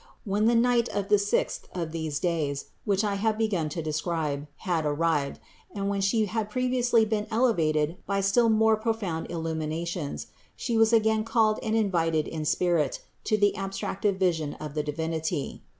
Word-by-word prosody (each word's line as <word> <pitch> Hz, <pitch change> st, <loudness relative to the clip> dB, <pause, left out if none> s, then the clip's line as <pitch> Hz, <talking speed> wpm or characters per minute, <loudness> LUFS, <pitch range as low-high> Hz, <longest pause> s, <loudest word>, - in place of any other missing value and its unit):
When 205 Hz, +1 st, +1 dB
the 235 Hz, -, +4 dB
night 240 Hz, 0 st, +3 dB
of 200 Hz, -1 st, -3 dB
the 210 Hz, -1 st, +5 dB
sixth 205 Hz, +1 st, -1 dB
of 165 Hz, -3 st, -3 dB
these 160 Hz, -3 st, -3 dB
days, 155 Hz, -6 st, -1 dB, 0.2 s
which 200 Hz, -1 st, +2 dB
I 205 Hz, -1 st, 0 dB
have 220 Hz, 0 st, +1 dB
begun 200 Hz, -8 st, 0 dB
to 165 Hz, +2 st, -4 dB
describe, 155 Hz, -2 st, -2 dB, 0.2 s
had 170 Hz, -4 st, +1 dB
arrived, 150 Hz, -1 st, 0 dB, 0.4 s
and 200 Hz, 0 st, -1 dB
when 200 Hz, -1 st, -1 dB
She 215 Hz, +3 st, +2 dB
had 215 Hz, +1 st, -2 dB
previously 245 Hz, -1 st, +2 dB
been 215 Hz, -1 st, -1 dB
elevated 165 Hz, -9 st, +1 dB
by 200 Hz, 0 st, +1 dB
still 215 Hz, +4 st, +3 dB
more 220 Hz, 0 st, +4 dB
profound 215 Hz, -7 st, -2 dB
illuminations, 160 Hz, -1 st, -3 dB, 0.3 s
She 235 Hz, -, -2 dB
was 225 Hz, 0 st, +5 dB
again 220 Hz, -1 st, +3 dB
called 220 Hz, -1 st, +2 dB
and 220 Hz, -1 st, -1 dB
invited 165 Hz, -7 st, +1 dB
in 155 Hz, -1 st, -4 dB
spirit 165 Hz, -3 st, +1 dB, 0.2 s
to 215 Hz, -, +2 dB
the 205 Hz, -1 st, +3 dB
abstractive 195 Hz, 0 st, -2 dB
vision 165 Hz, -6 st, 0 dB
of 150 Hz, -2 st, -7 dB
the 150 Hz, -, 0 dB
Divinity. 160 Hz, 0 st, -3 dB
190 Hz, 165 wpm, -27 LUFS, 160-220 Hz, 0.4 s, the